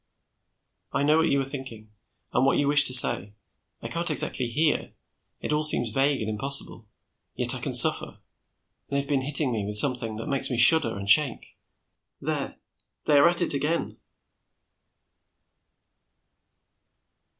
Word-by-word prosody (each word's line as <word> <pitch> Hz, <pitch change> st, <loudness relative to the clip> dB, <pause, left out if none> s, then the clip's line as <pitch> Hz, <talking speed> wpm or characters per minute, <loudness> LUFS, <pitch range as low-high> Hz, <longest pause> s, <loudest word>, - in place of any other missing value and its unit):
"I 140 Hz, -, -4 dB
know 150 Hz, +2 st, 0 dB
what 160 Hz, -, -1 dB
you 140 Hz, -, -1 dB
are -, -, -5 dB
thinking, 130 Hz, -6 st, -11 dB, 0.4 s
and 120 Hz, -, -1 dB
what 135 Hz, -, 0 dB
you 145 Hz, -, -2 dB
wish 145 Hz, 0 st, +3 dB
to -, -, +1 dB
say. 105 Hz, -4 st, +4 dB, 0.5 s
I -, -, -7 dB
can't 170 Hz, +1 st, -4 dB
exactly 135 Hz, -4 st, -2 dB
hear; 150 Hz, +6 st, -3 dB, 0.5 s
it -, -, -5 dB
all 150 Hz, +1 st, -3 dB
seems 120 Hz, -7 st, +1 dB
vague, 135 Hz, +3 st, -2 dB
and 110 Hz, -, -6 dB
impossible. 115 Hz, 0 st, -3 dB, 0.5 s
Yet -, -, 0 dB
I -, -, -7 dB
can -, -, -2 dB
suffer. -, -, +4 dB, 0.7 s
They 140 Hz, -, -6 dB
have 140 Hz, -, -7 dB
been 140 Hz, -2 st, -3 dB
hitting 140 Hz, 0 st, +3 dB
me 110 Hz, -3 st, -5 dB
with 105 Hz, +1 st, -4 dB
something 115 Hz, -2 st, +1 dB
which 115 Hz, -, -9 dB
makes 140 Hz, -2 st, -2 dB
me 125 Hz, -, -5 dB
shudder 115 Hz, -1 st, +6 dB
and 100 Hz, 0 st, -10 dB
shake 135 Hz, +4 st, 0 dB, 0.6 s
there, -, -, -6 dB, 0.5 s
they 145 Hz, -2 st, +1 dB
are 170 Hz, -, +3 dB
at 175 Hz, 0 st, -2 dB
it 170 Hz, -, -3 dB
again." 150 Hz, +4 st, -5 dB
135 Hz, 155 wpm, -22 LUFS, 115-150 Hz, 0.7 s, shudder